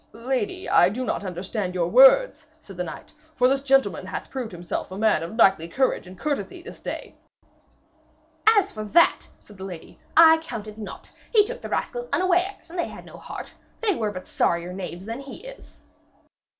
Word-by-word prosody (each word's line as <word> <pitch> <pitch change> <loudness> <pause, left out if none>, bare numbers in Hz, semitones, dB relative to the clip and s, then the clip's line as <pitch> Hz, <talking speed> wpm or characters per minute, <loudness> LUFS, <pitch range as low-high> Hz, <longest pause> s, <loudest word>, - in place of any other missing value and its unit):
'Lady, 265 - -3
I 175 - +5
do 250 +6 -4
not - - -2
understand 185 +1 -4
your 170 -2 +1
words,' 270 - +6
said 200 -11 -12
the 180 - -2
knight, 175 - -9 0.2
'for 250 - +4
this 270 +1 +1
gentleman 270 -1 +2
hath - - -6
proved 255 -4 -4
himself 175 -1 -5
a 190 - -6
man 215 -6 +2
of 165 +6 -6
knightly 195 -7 +4
courage 260 0 0
and 185 0 -12
courtesy 290 +6 -3
this - - -10
day.' - - -6 1.3
'As 410 -3 +5
for 215 - -6
that,' 335 +11 +3
said 205 -2 -17
the - - -7
lady, 180 -4 -9 0.2
'I 320 -1 +8
count 235 -9 -7
it 215 0 -10
naught. 210 - -9 0.2
He 425 -3 +5
took - - -7
the - - -7
rascals 485 0 -3
unawares, 365 -1 0
and 350 - -5
they - - 0
had - - -11
no - - -12
heart. - - -9 0.3
They 435 -3 +1
were 220 -10 -1
but 185 -2 -8
sorrier 170 +1 0
knaves 185 -1 -7
than 230 +3 -5
he 275 - -10
is.' - - -13
235 Hz, 190 wpm, -24 LUFS, -, 1.3 s, I